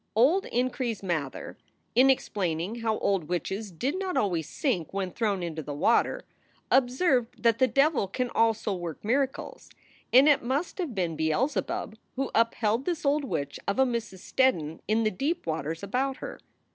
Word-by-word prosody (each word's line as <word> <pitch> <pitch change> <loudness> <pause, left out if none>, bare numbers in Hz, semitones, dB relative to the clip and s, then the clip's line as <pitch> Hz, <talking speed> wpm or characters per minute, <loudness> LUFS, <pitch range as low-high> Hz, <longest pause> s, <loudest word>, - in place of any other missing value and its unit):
Old 300 - +4
Increase 245 -3 -1
Mather, 155 -7 -3 0.3
in 255 +3 +6
explaining 195 -5 0
how 220 -1 0
old 195 -5 0
witches 190 +5 -3
did 265 - -2
not 380 -2 -2
always 175 -6 0
sink 230 - -1
when 190 -2 -2
thrown 205 -4 -1
into 160 -2 -4
the 145 0 -6
water, 225 +10 +2 0.5
observed 255 -1 +2
that 230 0 +4
the 260 - +5
devil 275 -5 +2
can 250 +5 -2
also 225 -2 +2
work 175 -1 -6
miracles, 265 +4 -1 0.4
and 265 +4 +7
it 290 -2 +5
must 275 +11 -2
have 315 -11 -3
been 175 -4 -1
Beelzebub 215 - -1 0.2
who 270 +1 -2
upheld 230 +1 +1
this 340 -4 -2
old 290 +1 +2
witch 140 - -3
of 200 - 0
a 265 - +5
Mrs. 230 -7 -3
Steddon 165 - +1
in 220 +1 +2
the 215 - +2
deep 295 - -2
waters 160 +2 -3
about 260 +6 -1
her. - - -7
230 Hz, 165 wpm, -28 LUFS, 180-265 Hz, 0.5 s, and